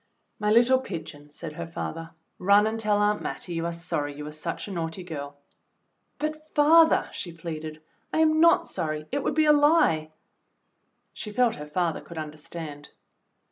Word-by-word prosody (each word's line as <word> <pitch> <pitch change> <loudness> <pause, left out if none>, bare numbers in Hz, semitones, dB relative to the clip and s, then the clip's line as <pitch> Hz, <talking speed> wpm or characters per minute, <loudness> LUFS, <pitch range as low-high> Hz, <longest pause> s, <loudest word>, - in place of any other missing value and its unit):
"My 210 0 +1
httle 250 +3 +5
pigeon," 155 - -8
said 150 +1 -8
her 170 +1 -6
father. 165 0 -5 0.3
"Run 200 +3 +5
and 220 +1 -1
tell 210 -2 +2
Aunt 205 0 +2
Mattie 175 - -5
you 165 0 -1
are - - -2
sorry 150 -4 -3
you 150 - -7
were 150 - -6
such 155 +5 -5
a - - -7
naughty 165 0 -4
girl." 145 -4 -7 0.8
"But, 310 0 -4
father," 320 +2 +6
she 175 - -5
pleaded, 155 -2 -7 0.3
"I - - -1
am 315 0 +4
not 335 +1 +5
sorry; 155 -3 -3
it 285 +2 0
would - - -1
be 310 0 +4
a 300 - +7
lie." 290 - +4 1.0
She 210 - -7
felt 240 +1 +2
her 150 0 -8
father 170 +1 -1
could 170 - -11
understand. 150 -1 -7
170 Hz, 175 wpm, -26 LUFS, 155-235 Hz, 1.0 s, a